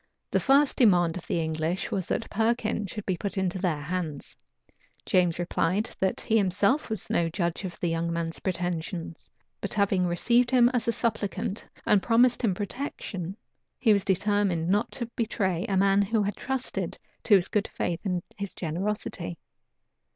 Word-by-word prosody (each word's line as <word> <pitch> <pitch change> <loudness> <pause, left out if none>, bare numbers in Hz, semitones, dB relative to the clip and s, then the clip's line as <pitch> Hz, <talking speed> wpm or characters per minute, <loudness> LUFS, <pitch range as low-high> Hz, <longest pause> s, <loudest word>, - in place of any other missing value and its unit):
The - - +3
first 280 +1 +4
demand 175 -8 +4
of 180 - -7
the - - 0
English 160 +2 -2
was, 190 -3 -2
that - - -1
Perkin 220 -1 0
should 210 +3 -6
be 185 - 0
put 200 +2 -4
into 190 -1 0
their 165 -6 -1
hands: 160 -2 -4 0.7
James 180 -3 +2
replied, 180 +4 0
that 190 0 0
he 225 - +2
himself 200 +8 +2
was 220 -4 -2
no 170 -1 +2
judge 170 +2 -2
of 175 -2 -7
the 175 - 0
young 165 +1 -1
man's 165 -1 -3
pretensions; 175 -2 -4 0.3
but 200 - -4
having 195 -3 +2
received 235 +8 +2
him 245 -1 +5
as 245 -3 -1
a - - +4
supplicant, 220 -2 -2 0.2
and 205 - +4
promised 240 +2 +4
him 210 -7 +1
protection, 200 - -5 0.4
he 220 -4 +4
was 200 -2 +2
determined 190 -3 +1
not 210 +5 +1
to 240 - -2
betray 200 -4 -1
a 195 - +1
man 195 +1 +4
who 210 +2 +1
had 205 0 -2
trusted 265 -1 -3 0.3
to 210 - +7
his 185 -2 +3
good 210 0 0
faith 170 -1 -2
and 180 -4 -1
his 200 -2 -5
generosity. 175 0 -3
195 Hz, 170 wpm, -27 LUFS, 175-220 Hz, 0.7 s, to